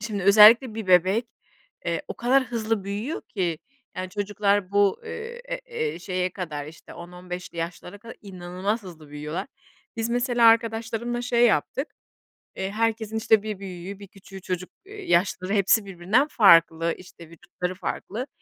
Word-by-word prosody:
şimdi 210 -3 -4
özellikle 215 +4 +7
bir 220 -3 -5
bebek, 185 +6 +4 0.6
eee, - - -2
o - - -5
kadar 260 +2 +2
hızlı 225 -4 -2
büyüyor 210 +10 -4
ki, 175 -7 -2 0.4
yani, 185 0 -4
çocuklar 205 -1 0
bu, 200 -1 +2
eee, 470 +1 -7
eee, - - -4
eee, 460 -1 -3
şeye 185 -2 -2
kadar, 155 -6 -5
işte, 160 +2 -13
10-15'li 180 0 -8
yaşlılara 175 +3 -6
kadar 230 +2 -11
inanılmaz 190 +3 -4
hızlı 160 -5 -12
büyüyorlar. 150 - -5 0.5
Biz 225 0 -2
mesela 245 -1 +2
arkadaşlarımla 230 +1 0
şey 240 -1 +3
yaptık, 270 +6 0 0.7
ııı, 190 0 -2
herkesin, 220 0 -1
işte, 220 -1 +3
bir 210 -3 -5
büyüğü, 190 +1 -8
bir 200 - -11
küçüğü 195 0 -13
çocuk 185 0 -4 0.2
yaşları 205 - -1
hepsi 200 +1 +3
birbirinden 195 +9 +1
farklı, 165 - +5
işte, 170 -2 -14
vücutları 180 +1 -6
farklı. 215 +6 -5
200 Hz, 145 wpm, -25 LUFS, 180-230 Hz, 0.7 s, özellikle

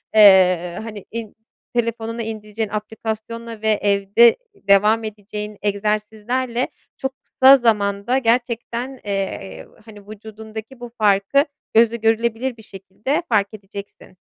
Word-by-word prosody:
Eee, 185 -4 +6
hani, 215 -3 -8
in 225 -2 -6 0.4
telefonuna 230 -1 -2
indireceğin 215 -1 -5
aplikasyonla 220 +1 -5
ve 220 - +1
evde 200 +3 +4 0.2
devam 210 - +3
edeceğin 210 0 -7
egzersizlerle 215 +4 -1 0.3
çok 265 0 -3
kısa 265 +1 +6
zamanda 210 0 +1
gerçekten, 240 +1 -1
eee, 190 - -4 0.2
hani, 210 -2 -13
vücudundaki 220 +3 -10
bu 240 0 -8
farkı 210 +6 +3 0.3
gözle 230 +1 +5
görülebilir 230 +2 0
bir 220 - -14
şekilde 210 - -4
fark 205 -4 +3
edeceksin. 200 -2 -11
220 Hz, 110 wpm, -21 LUFS, 205-235 Hz, 0.4 s, Eee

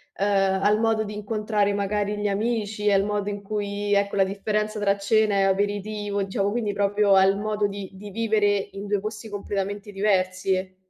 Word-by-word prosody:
ehm, 195 -1 +1
al 210 +1 +4
modo 225 -1 +2
di 210 0 -6
incontrare 210 -1 -1
magari 205 +1 -1
gli 205 - 0
amici, 210 0 -1
al 195 0 +4
modo 205 -1 -2
in 205 0 -5
cui, 205 0 -2
ecco, 200 0 +1
la 195 - +5
differenza 210 +2 -2
tra 200 -1 +2
cena 210 +1 +2
e 195 - +3
aperitivo, 205 +1 -1
diciamo, 195 +1 -1
quindi 220 -3 -1
proprio 205 0 +2
al 195 +1 +5
modo 210 0 0
di 200 -1 -6
di 205 +1 -9
vivere 205 -2 +1
in 200 +1 -7
2 205 -1 0
posti 215 +1 -6
completamente 205 0 -4
diversi. 185 -1 0
205 Hz, 175 wpm, -24 LUFS, 195-210 Hz, -, la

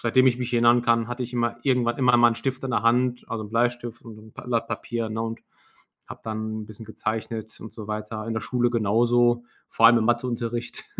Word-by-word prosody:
seitdem 130 +2 +3
ich 125 -2 +4
mich 125 -1 -4
erinnern 120 0 +4
kann, 115 -1 +2
hatte 120 +1 -4
ich 125 - -6
immer 120 -1 -1
irgendwann 125 -3 +1
immer 125 -2 +4
mal 120 0 +6
'n 115 - -2
Stift 130 0 -3
in 130 - -3
der 115 - 0
Hand, 125 +1 +2
also, 115 -2 -4
'n - - -9
Bleistift 120 0 -1
und 115 -2 -11
'n 110 0 -15
Blatt 115 -2 -2
Papier, 115 0 -3
ne, 110 +1 -2
und 115 0 -5 0.7
habe - - -9
dann 110 0 -4
'n - - -10
bisschen 110 +1 -10
gezeichnet 110 0 -5
und 110 - -9
so 110 -3 -9
weiter. 110 0 -5
In 115 - -3
der 110 - -1
Schule 120 -1 0
genauso, 120 +2 +2 0.2
vor 115 - +5
allem 120 0 +7
im 110 - 0
Matheunterricht. 120 0 -2
120 Hz, 225 wpm, -25 LUFS, 110-120 Hz, 0.7 s, allem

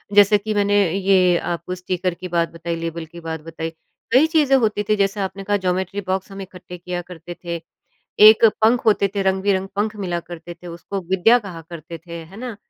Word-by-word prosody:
जैसे 205 0 +7
कि 215 +1 -4
मैंने 205 0 +2 0.2
ये 185 -2 +3
आपको 175 +1 -4
स्टीकर 180 0 -2
की 180 +1 -8
बात 170 -1 0
बताई, 165 0 -4
लेबल 165 0 -5
की 170 +2 -12
बात 160 -1 -5
बताई। 165 0 -5 0.4
कई 275 +6 +6
चीज़ें 300 -4 +3
होती 215 -3 0
थीं 215 +1 +1
जैसे 200 +1 0
आपने 195 +1 -4
कहा 205 +1 +1
ज्योमेट्री 185 +1 -2
बॉक्स 190 +1 -2
हम 195 - -7
इकट्ठे 180 -1 -10
किया 175 0 -5
करते 175 -1 -10
थे। 170 -1 -4 0.7
एक 220 +1 +7 0.2
पंख 235 +2 +3
होते 205 -2 +4
थे, 200 - +1
रंग-बिरंग 190 0 +1
पंख 210 +1 -1
मिला 180 -4 -2
करते 170 0 -9
थे, 175 +1 -13
उसको 175 +3 -6
विद्या 190 +6 +5
कहा 185 -7 -9
करते 170 0 -8
थे 170 - -8
है 190 +6 -14
ना? 245 -2 -6
185 Hz, 205 wpm, -21 LUFS, 170-205 Hz, 0.7 s, जैसे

